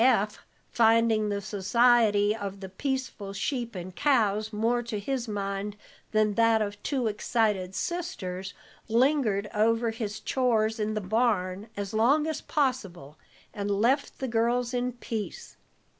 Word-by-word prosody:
Eph, 215 -5 +3 0.3
finding 225 -1 +3
the 200 0 -2
society 210 +1 +3
of 200 -2 -6
the 190 -1 -7
peaceful 255 -3 -3
sheep 235 +1 -3
and 180 0 -7
cows 220 -7 +2
more 230 +3 +1
to 230 -2 -4
his 250 +3 -3
mind 200 0 -3 0.3
than 215 -1 +2
that 230 0 +4
of 205 -1 -3
two 265 -4 -1
excited 210 -3 0
sisters, 195 - -4 0.3
lingered 230 -4 +2
over 230 +2 +2
his 220 -1 -4
chores 225 -3 +1
in 215 0 -1
the 215 - -1
barn 205 -1 0
as 200 0 -4
long 265 +8 +3
as 315 -1 -3
possible, 195 - -2 0.3
and 205 0 -3
left 235 +8 +1
the 265 - -3
girls 240 +1 +1
in 250 0 -1
peace. 220 -6 -6
220 Hz, 140 wpm, -28 LUFS, 205-240 Hz, 0.3 s, that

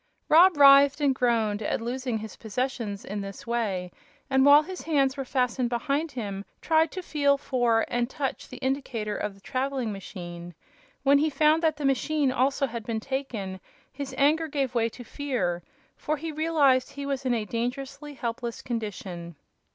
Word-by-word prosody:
Rob 345 +1 +7
writhed 280 0 +7
and 285 -2 +3
groaned 225 -5 +1
at 205 - -1
losing 245 0 -2
his 220 0 -8
possessions 225 -3 -3
in 205 +1 -4
this 195 -1 -8
way, 205 -7 -2 0.4
and 265 0 +4
while 285 +2 +8
his 370 +3 -7
hands 275 -4 +1
were 275 - -3
fastened 250 -2 0
behind 280 +6 -1
him 200 -5 -4 0.2
tried 320 0 +3
to 370 - -5
feel 285 -4 +2
for 245 -5 +1
and 240 0 -1
touch 270 -1 -4
the 255 - -9
indicator 260 -5 -2
of 210 -2 -3
the 195 - -20
traveling 260 -1 -2
machine. 175 -3 -8 0.5
When 280 +1 +5
he 310 +2 +2
found 305 +3 +3
that 315 -2 +1
the 295 - -3
machine 275 +1 +1
also 270 +2 +1
had 235 -3 -5
been 225 0 -2
taken, 220 -7 -4 0.3
his 280 0 -6
anger 310 +3 +3
gave 275 -4 -2
way 230 -1 +1
to 245 - -11
fear, 225 -10 -2 0.3
for 305 +1 -2
he 320 +2 -5
realized 295 -5 +2
he 280 0 -6
was 275 -1 -2
in 250 -2 +1
a 220 -2 -2
dangerously 275 +6 -4
helpless 235 -1 -4
condition. 190 -7 -5
260 Hz, 175 wpm, -27 LUFS, 225-285 Hz, 0.5 s, while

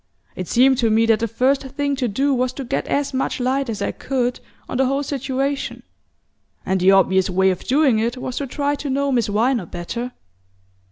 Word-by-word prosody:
It 185 - -5
seemed 260 +1 +4
to 230 -3 +2
me 220 +1 +3
that 225 -2 +3
the 230 - 0
first 255 +5 +1
thing 280 +1 -2
to 255 -2 0
do 275 +7 +1
was 255 0 0
to 275 - -6
get 260 +2 -2
as 285 -1 -1
much 265 0 -1
light 260 +1 0
as 215 - -3
I - - -1
could 250 -2 -2 0.3
on - - -3
the 265 0 +3
whole 275 +2 0
situation; 275 0 -3 0.8
and 190 0 0
the 185 +1 +4
obvious 190 -1 +4
way 190 +1 +3
of 185 - -5
doing 265 -4 +3
it 235 +3 -1
was 250 0 -5
to 280 - -2
try 285 +2 -1
to 290 0 -4
know 280 +1 0
Miss 240 -4 +1
Viner 220 -1 +1
better. 235 +10 -5
255 Hz, 210 wpm, -21 LUFS, 225-275 Hz, 0.8 s, seemed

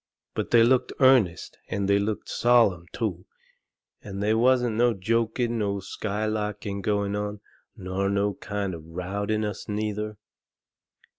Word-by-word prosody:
But - - -3
they 115 -1 +6
looked 125 +2 +3
earnest 130 -10 +3
and 100 0 -1
they 100 0 +4
looked 105 +1 -2
sollum, 115 -8 +3
too, 95 -6 -3 0.7
and 100 -1 -7
they 105 +1 +3
wasn't 120 0 +3
no 120 0 +3
joking 115 +4 0
nor 100 -1 -1
skylarking 105 0 -3
going 100 0 0
on, 105 0 -3 0.4
nor 95 +1 -2
no 100 0 +1
kind 100 -1 -4
of 85 - -7
rowdyness, 100 +5 -3
neither. 105 0 -3
105 Hz, 130 wpm, -26 LUFS, 100-110 Hz, 0.7 s, they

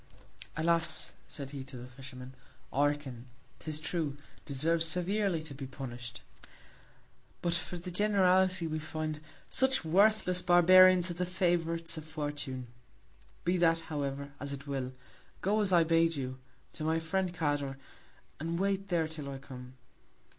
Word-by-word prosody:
Alas! 165 -1 +4 0.2
said 140 -2 -7
he, 140 -2 -6
to 130 -1 -10
the 120 - -8
Fisherman, 130 0 -10 0.4
Orcan, 140 -3 0 0.3
'tis 155 -1 -2
true, 150 -2 -2 0.3
deserves 160 +4 +1
severely 180 +1 +1
to 155 -3 -8
be 135 -1 -7
punish'd: 125 -3 -7 1.2
But 170 - +1
for 170 +1 -2
the 180 +1 -6
Generality, 185 -2 +3
we 155 -1 -2
find, 155 0 -4 0.3
such 265 -7 +2
worthless 190 +1 +4
Barbarians 185 0 +7
are - - -2
the 175 +1 -2
Favourites 170 -2 0
of 155 - -11
Fortune. 145 -4 -4 0.8
Be 180 +1 +2
that, 165 -1 +3
however, 140 -1 -3
as 140 0 -4
it 140 0 -7
will, 135 -2 -3 0.5
go 210 +3 +2
as 200 -2 +1
I 170 -2 +6
bade 165 0 +3
you, 130 -2 -4 0.3
to - - -6
my 160 +1 +1
Friend 180 +3 -1
Cador, 145 -5 -1 0.6
and 165 +2 -2
wait 195 0 0
there 170 -4 +1
till 155 -3 -6
I 135 - -5
come. 130 -1 -11
160 Hz, 145 wpm, -31 LUFS, 140-180 Hz, 1.2 s, Barbarians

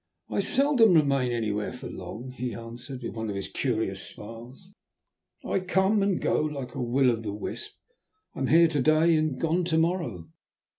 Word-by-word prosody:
"I - - 0
seldom 255 -8 +4
remain 140 -5 +3
anywhere 105 -3 -1
for - - -10
very - - -6
long," 125 +4 -7
he 125 -1 -4
answered, 120 +3 -7
with - - -4
one 110 -1 -4
of 100 - -3
his 100 - -4
curious 110 -7 -2
smiles. 120 - -10 0.8
"I - - 0
come 190 +3 +2
and 195 -2 +1
go - - +1
like 145 -4 -4
a - - -4
Will 125 +2 +3
o' 115 - -1
the 110 -2 -5
wisp; 420 - -6 0.6
I - - -8
am 135 - 0
here 170 +3 +6
to 150 -4 0
day 155 +4 +4
and 155 -3 0
gone 170 +2 +1
to 165 -2 +1
morrow." 160 - -1
135 Hz, 190 wpm, -27 LUFS, 115-170 Hz, 0.8 s, here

